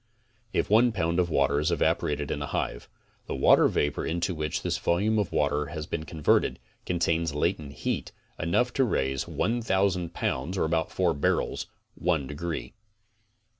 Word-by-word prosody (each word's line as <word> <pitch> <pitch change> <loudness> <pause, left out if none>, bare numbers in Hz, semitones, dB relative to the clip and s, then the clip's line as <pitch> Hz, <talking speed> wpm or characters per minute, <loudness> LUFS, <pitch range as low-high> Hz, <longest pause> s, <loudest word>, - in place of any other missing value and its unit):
If - - 0
one 115 +3 +5
pound 85 -3 0
of 90 -1 +2
water 70 -2 +2
is 75 - +1
evaporated 75 -1 0
in - - -2
a - - -3
hive, - - -3 0.4
the - - -3
water - - +6
vapor 75 0 0
into 85 +3 -1
which 75 -2 -3
this - - -1
volume 105 +6 +2
of 100 - -1
water 75 0 +1
has 80 -2 -5
been 80 -1 -4
converted, 75 0 +1 0.3
contains 85 -3 0
latent 75 -2 -1
heat - - -1 0.3
enough 120 +10 +1
to 135 - +3
raise 65 - 0
1,000 95 -5 0
pounds 85 +3 -2
(about 80 -1 0
four 90 -3 +1
barrels) 70 - 0 0.3
one 80 -5 0
degree. 80 +4 -5
85 Hz, 155 wpm, -27 LUFS, 75-95 Hz, 0.4 s, water